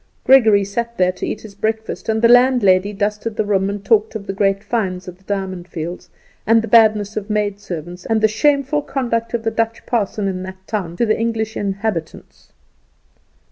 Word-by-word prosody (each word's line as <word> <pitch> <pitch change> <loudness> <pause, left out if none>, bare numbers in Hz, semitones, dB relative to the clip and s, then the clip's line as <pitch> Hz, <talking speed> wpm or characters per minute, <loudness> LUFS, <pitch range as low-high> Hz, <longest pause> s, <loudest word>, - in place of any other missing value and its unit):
Gregory 220 -6 +5
sat 235 +4 -4
there 180 0 +3
to 180 - -5
eat 215 - -4
his 215 -2 -11
breakfast, 220 +2 -3
and 220 +1 0
the - - +8
landlady 235 -6 +4
dusted 210 +2 -2
the 215 - 0
room 195 -1 +1
and 200 0 -5
talked 220 0 +2
of 205 -2 -5
the 195 - -4
great 195 0 +1
finds 190 -4 -2
at 180 - -8
the - - -26
Diamond 190 -3 -4
Fields, 170 0 -6 0.4
and 225 0 +4
the - - -4
badness 215 -2 +4
of 215 0 -4
maid 205 -1 -1
servants, 175 -1 -7
and 225 -1 +2
the 220 - +4
shameful 280 +6 +1
conduct 235 -5 -2
of 230 - -3
the 225 - 0
Dutch 225 0 -2
parson 210 -3 -1
in 185 -1 -3
that 185 0 -7
town 180 -6 -4
to 235 - +2
the 215 -1 +1
English 225 -1 -2
inhabitants. 200 -4 -4
210 Hz, 195 wpm, -19 LUFS, 195-225 Hz, 0.4 s, the